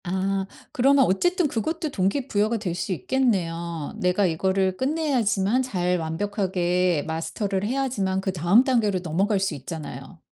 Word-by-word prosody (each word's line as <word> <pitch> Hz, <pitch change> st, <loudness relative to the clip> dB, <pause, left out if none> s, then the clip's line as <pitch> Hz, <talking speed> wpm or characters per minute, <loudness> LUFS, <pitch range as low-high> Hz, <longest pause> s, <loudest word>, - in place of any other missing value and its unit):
아 190 Hz, +2 st, -1 dB, 0.3 s
그러면 270 Hz, +1 st, +4 dB
어쨌든 355 Hz, -, +2 dB
그것도 310 Hz, -, -2 dB
동기부여가 215 Hz, +1 st, 0 dB
될 200 Hz, -5 st, -3 dB
수 180 Hz, +3 st, -3 dB
있겠네요. 170 Hz, -, -1 dB
내가 180 Hz, +2 st, +2 dB
이거를 190 Hz, +2 st, +1 dB
끝내야지만 255 Hz, -7 st, +1 dB
잘 180 Hz, -8 st, 0 dB
완벽하게 180 Hz, -1 st, 0 dB
마스터를 175 Hz, +5 st, -2 dB
해야지만 225 Hz, -7 st, -1 dB
그다음 190 Hz, +4 st, +3 dB
단계로 225 Hz, -8 st, +1 dB
넘어갈 195 Hz, +5 st, +1 dB
수 195 Hz, -3 st, -1 dB
있잖아요. 145 Hz, 0 st, -8 dB
195 Hz, 335 characters per minute, -24 LUFS, 175-235 Hz, 0.3 s, 그러면